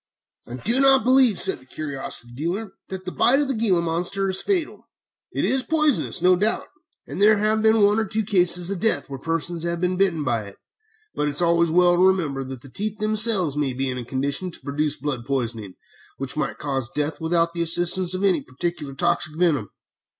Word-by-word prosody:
"I 120 - -7
do 230 - +2
not 270 -2 +5
believe," 255 -5 +4
said - - +1
the 130 - -20
curiosity 135 -5 -6
dealer, 180 - -4 0.2
"that 190 -1 -6
the 180 - -4
bite 265 +8 +4
of 290 - 0
the 270 - -1
gila 205 -7 +1
monster 175 +4 -1
is 190 - +1
fatal. 370 -6 -2 0.4
It - - -1
is 265 - +2
poisonous, 305 - 0
no 180 0 +5
doubt, 210 +5 -1 0.4
and - - -6
there 215 +1 +6
have 215 +1 +1
been 220 -1 +4
one 205 +2 +4
or 220 - 0
two 220 +2 -1
cases 180 -3 +3
of 195 - -3
death 220 -8 0
where 135 - -6
persons 165 +2 -3
have 170 0 -3
been 180 +1 -1
bitten 180 -5 +1
by 115 -6 -1
it, 100 - -13 0.6
but 150 - -1
it 145 - -3
is 150 - +2
always 170 0 +2
well 175 +1 +4
to - - +2
remember 155 -8 0
that 130 -2 -8
the - - -11
teeth 210 - -4
themselves 215 -7 +2
may 145 -3 -1
be 135 +1 -2
in 125 - -5
a - - -6
condition 140 +8 -3
to 170 - -11
produce 145 +2 -2
blood 135 -3 -4
poisoning, 115 -7 -4 0.4
which 135 -1 -5
might 150 -2 -3
cause 135 -4 -3
death 150 +4 -3
without 170 +1 +1
the 170 - -3
assistance 175 +2 +1
of 185 - -3
any 185 -6 +2
particular 145 +1 -5
toxic 165 +1 0
venom. 150 - +1
170 Hz, 210 wpm, -23 LUFS, 140-200 Hz, 0.6 s, there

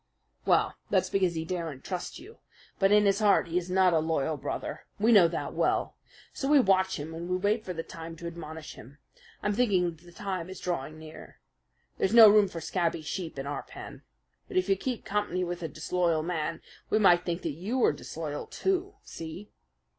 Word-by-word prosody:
"Well, - - +3 0.2
that's - - +1
because 185 -3 +2
he 160 0 -3
daren't 165 -6 -4
trust 180 -2 -5
you. 435 +5 -13 0.4
But 195 0 +4
in 210 0 +6
his 200 0 +3
heart 205 -5 +3
he 175 +2 +1
is 180 0 -8
not 185 -1 +4
a 160 - +4
loyal 160 -1 0
brother. - - -5
We 220 +3 +4
know 200 -6 +8
that 165 - -4
well. - - 0 0.4
So 270 - -3
we 295 0 +6
watch 190 - +2
him 155 +3 -6
and 170 +2 -6
we 180 - +1
wait 210 +4 +1
for 185 - -5
the 165 -1 -4
time 165 -1 -8
to 170 - -10
admonish 160 -2 -7
him. 135 +6 -14 0.5
I'm 205 - +1
thinking 200 -7 +2
that 165 0 -17
the 175 - -15
time 185 -1 -4
is 190 - -8
drawing 155 -3 -3
near. 155 0 -12 0.6
There's 200 +4 +2
no 225 -2 +11
room 205 -1 +6
for 170 -2 -6
scabby 170 -1 -1
sheep 165 -1 -5
in 135 - -4
our 145 +1 -3
pen. - - -10 0.5
But 370 - -4
if 370 - +2
you 195 - +5
keep 245 +4 -4
company 200 -3 -1
with 175 0 -4
a 165 - -2
disloyal 160 +1 0
man, 165 -1 -3 0.3
we - - +3
might 175 -4 +5
think 175 0 -3
that - - -1
you 190 - -3
were 245 - +4
disloyal, 150 0 -6
too. 385 +1 -1
See?" 165 +5 -8
180 Hz, 205 wpm, -29 LUFS, 160-200 Hz, 0.6 s, no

